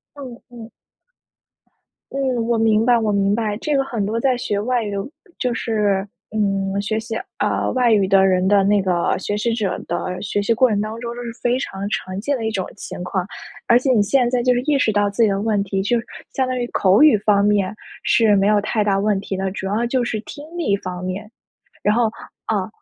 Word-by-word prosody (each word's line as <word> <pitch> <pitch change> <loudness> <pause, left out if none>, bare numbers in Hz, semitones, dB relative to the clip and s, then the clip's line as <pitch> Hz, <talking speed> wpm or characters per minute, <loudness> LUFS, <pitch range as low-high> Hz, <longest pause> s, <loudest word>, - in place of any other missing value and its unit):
嗯 260 -4 -9
嗯。 235 -2 -11 1.4
嗯， 260 -4 0
我 235 -1 +1
明 220 -1 +3
白 240 -1 +4
我 220 -2 0
明 200 0 +2
白。 215 -2 -1
这 295 +6 -2
个 275 - +3
很 230 -6 -3
多 225 +3 -1
在 255 0 +2
学 205 -4 -2
外 245 +2 0
语 205 - -4 0.5
就 250 -2 -1
是， 205 -4 0 0.2
嗯， 200 -2 0
学 215 +2 -1
习， 225 0 -5 0.2
呃， - - 0
外 250 -2 +2
语 205 -3 +4
的 195 0 +4
人 185 -1 +2
的 200 0 +4
那 205 0 +3
个 180 -2 +1
学 205 - -3
习 225 +2 0
者 205 -5 -1
的 180 +1 -3
学 205 0 -1
习 215 - +1
过 250 +2 +4
程 210 -2 0
当 215 +2 -3
中， 235 0 -5
都 245 - -6
是 230 - -5
非 245 +1 +2
常 200 -6 -4
常 185 -2 -3
见 280 +6 -1
的 225 - -3
一 - - 0
种 195 -4 -2
情 195 - -7
况。 180 0 -2 0.4
而 235 0 +6
且 265 +1 -1
你 215 - +4
现 240 +4 +2
在 250 -1 +1
就 250 - +3
是 245 - +1
意 290 -2 +3
识 220 - +2
到 205 0 +2
自 200 +3 0
己 220 - +5
的 195 - -1
问 210 -1 +1
题， 195 0 -2
就 235 +4 +1
是 230 - -5 0.3
相 260 - +1
当 255 0 -2
于 240 - -1
口 190 +6 +4
语 300 -7 +7
方 200 -1 +2
面 205 -1 +1 0.3
是 215 -3 +4
没 195 - +2
有 210 0 +4
太 210 +1 0
大 195 -1 +2
问 205 -1 +1
题 195 - -5
的。 190 0 -2
主 190 0 -5
要 220 +4 0
就 250 0 0
是 215 -2 -2
听 290 +6 -10
力 325 -13 0
方 180 -2 -6
面， 195 +4 -5 0.5
然 210 - +2
后 235 -2 +2 0.4
啊， - - -1
215 Hz, 245 characters per minute, -20 LUFS, 200-235 Hz, 1.4 s, 语